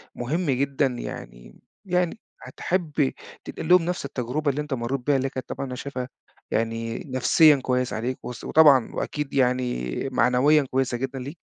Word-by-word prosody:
مهم 145 +5 -1
جدًا، 140 +2 +1
يعني - - -8 0.3
يعني 180 +2 0 0.2
هتحب 160 -6 -1 0.3
تنقل 160 - -6
لهم 180 -2 +6
نفس 175 -5 -2
التجربة 140 +3 -1
اللي 150 +3 -3
أنت 150 -2 -5
مرِّت 125 +2 -2
بيها 145 - +4
اللي 135 +1 -1
كانت 130 -1 -7
طبعًا 140 - -4
أنا 125 - -5
شايفها 130 -1 -5 0.4
يعني 115 0 -2
نفسيًا 145 +4 +5
كويس 125 -1 0
عليك، 120 +4 -3
وس 125 - -7
وطبعًا 145 -6 +5
وأكيد 150 -2 -3
يعني 125 - 0 0.2
معنويًا 140 +5 +4
كويسة 130 -2 0
جدًا 135 +1 -4
ليك؟ 140 +7 -7
135 Hz, 155 wpm, -25 LUFS, 125-150 Hz, 0.4 s, لهم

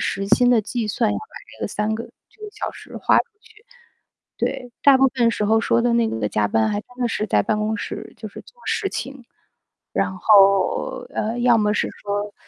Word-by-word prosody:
时 195 0 -2
薪 245 +4 +4
的 235 -3 +4
计 230 +1 -3
算 215 0 +1
要 - - -2
把 - - -10 0.3
这 - - -8
个 - - -1
3 210 +1 -1
个 230 +1 -5 0.3
这 430 - -21
个 425 - -6
小 430 - -4
时 - - -13
花 - - +3
出 - - +1 0.2
去， 450 -1 -21 0.7
对。 255 -2 -3
大 280 -2 +7
部 270 - +5
分 235 -2 +3
时 210 - -2
候 220 +1 +4
说 230 - +2
的 240 -1 +2
那 235 -1 +3
个 110 - -2
加 105 +1 0
班 110 +1 +2
还 205 - -1
真 - - -56
的 240 - +1
是 215 -1 -2
在 105 - +2
办 215 - -1
公 215 +1 -1
室 - - -6
就 - - -7
是 - - -11
做 485 -1 -21
事 400 -2 0
情， 270 -2 -6 0.7
然 190 - 0
后， 195 -1 +3
呃， 225 +3 -2
要 240 -1 +5
么 210 -1 +2
是 - - 0
说， 205 0 -4
220 Hz, 235 characters per minute, -22 LUFS, 205-250 Hz, 0.7 s, 大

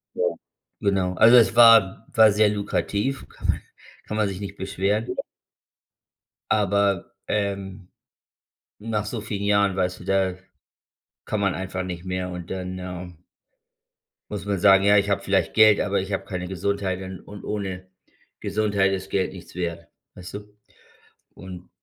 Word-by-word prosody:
Ja. - - -1 0.6
Genau. 95 -2 +1
Also 115 +2 +7
es 115 -1 +4
war 115 -3 +6
w - - -16
war 110 -1 +8
sehr 105 +1 +4
lukrativ, 105 +5 -2
kann - - -8
man - - +1 0.5
kann 105 - -3
man 105 -2 +2
sich 95 -1 -5
nicht 100 0 -7
beschweren. 100 +4 -1 1.4
Aber, 100 -2 +1
ähm, 100 -2 -3 0.9
nach 105 -1 -2
so 115 +1 -4
vielen 100 -1 -4
Jahren, 100 -1 +2
weißt 90 -1 -1
du, - - -10
da 95 -1 +1 0.9
kann 110 - -2
man 100 -2 +1
einfach 95 0 -4
nicht 90 -2 -6
mehr. 90 0 -3
Und 90 -1 -7
dann 95 0 -5
äh 90 -1 -7 1.2
muss 100 -2 -5
man 100 -2 -1
sagen: 95 0 +6
„Ja, 100 0 +5
ich 100 0 +2
habe 100 - +1
vielleicht 95 -4 0
Geld, 110 -2 +6
aber 100 -1 0
ich 95 +2 -4
habe 95 - -2
keine 90 -2 -5
Gesundheit 95 0 -2
und 95 -1 -7
und 105 0 -11
ohne 95 -3 -5 0.5
Gesundheit 100 -2 +1
ist 95 0 -4
Geld 95 -1 -1
nichts 90 -1 -12
wert.“ 85 -2 -4 0.3
Weißt 90 +1 -10
du? 105 0 -10 0.8
Und 90 -1 -10
95 Hz, 155 wpm, -24 LUFS, 95-105 Hz, 1.4 s, war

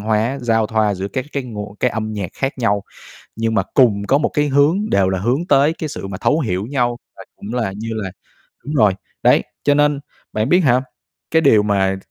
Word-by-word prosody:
hóa, 110 +5 0
giao 115 -3 +1
thoa 110 -2 +1
giữa 95 +1 -4
các 130 +6 -3
cái 140 - -2
nguồn 105 -4 -7
cái 125 - +2
âm 110 -1 -3
nhạc 100 -4 -4
khác 135 +1 -1
nhau 100 -4 +1 0.5
nhưng 115 0 -1
mà - - +3
cùng 115 -7 +4
có 140 - +4
một 150 - +1
cái 150 0 0
hướng 150 +10 +2
đều 95 -1 +3
là 95 0 0
hướng 125 - 0
tới 145 0 +4
cái 160 -1 -5
sự 120 - -6
mà 95 -1 -6
thấu 155 - +2
hiểu 95 - -2
nhau 120 -2 0 0.2
và - - -11
cũng 105 +4 -7
là 115 -6 -1
như 110 +2 -5
là 105 -4 -4 0.5
đúng 150 - -4
rồi, 105 -8 +4 0.3
đấy, - - +5 0.2
cho 145 - +4
nên 145 -1 +2 0.3
bạn 110 +3 0
biết 180 +3 +5
hả, 130 -7 +3 0.5
cái 160 +1 +3
điều 110 -7 +5
mà 95 -2 +1
115 Hz, 225 wpm, -19 LUFS, 105-140 Hz, 0.5 s, đấy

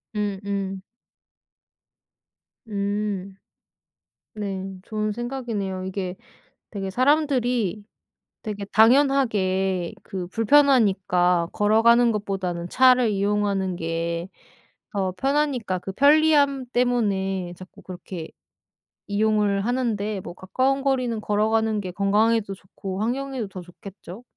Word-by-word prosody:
음음. 200 -2 -3 1.9
음. 200 -2 -3 1.0
네. 195 -3 -4 0.2
좋은 215 -1 -2
생각이네요. 225 -6 -4
이게 185 -1 -4 0.5
되게 195 -2 -4
사람들이 250 - +1 0.6
되게 205 -2 -5
당연하게 210 -7 +2
그 185 -2 -5
불편하니까 195 -8 +3
걸어가는 230 +3 +4
것보다는 190 -4 -3
차를 255 -1 +5
이용하는 200 -2 0
게 170 +1 -3 0.7
더 190 -2 0
편하니까 270 -7 0
그 195 - -6
편리함 285 +1 +4
때문에 195 -7 0
자꾸 185 0 -13
그렇게 180 -2 -8 0.8
이용을 205 -1 +1
하는데 220 -5 -1
뭐 175 - -8
가까운 260 +10 0
거리는 255 -5 0
걸어가는 215 +1 +1
게 185 -2 -6
건강에도 205 +2 +1
좋고 190 +1 -7
환경에도 255 0 -2
더 185 -1 -9
좋겠죠? 190 +4 -12
205 Hz, 235 characters per minute, -24 LUFS, 190-240 Hz, 1.9 s, 차를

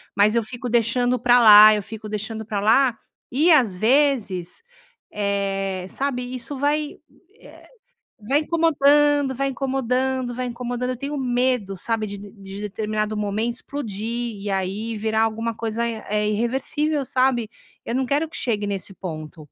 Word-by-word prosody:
mas 210 +2 +4
eu 235 - +2
fico 240 +2 -6
deixando 245 +2 +2
pra 245 +1 +4
lá, 215 -1 +9
eu 210 - 0
fico 215 +1 -8
deixando 220 +1 -5
pra 210 -2 -3
lá 230 +4 +3 0.4
e 300 +7 +3
às 245 -11 +4
vezes, 220 -7 +1 0.5
eh, 195 -2 -2
sabe, 250 -2 -3
isso 255 +3 -5
vai, 295 +2 -1 0.4
eh, - - -16 0.6
vai 285 +3 +3
incomodando, 295 -3 +3
vai 275 +2 -2
incomodando, 260 -1 -1
vai 255 +1 -3
incomodando. 245 +1 -3
Eu - - -6
tenho 280 +4 -5
medo, 245 -6 0
sabe, 225 +3 -1
de 200 0 -7
de 200 -1 -10
determinado 215 +1 -3
momento 210 +3 -1
explodir 235 -3 -4
e 205 - -3
aí 195 +4 -2
virar 220 +1 0
alguma 225 +1 -1
coisa, 230 +1 -2
eh, 210 -2 -2
irreversível, 270 +7 -1
sabe. 255 -3 +1 0.4
Eu 230 - -4
não 260 +1 +1
quero 290 +5 0
que - - -9
chegue 210 -5 -1
nesse 200 -1 -4
ponto. 155 -4 -8
230 Hz, 150 wpm, -22 LUFS, 210-260 Hz, 0.6 s, lá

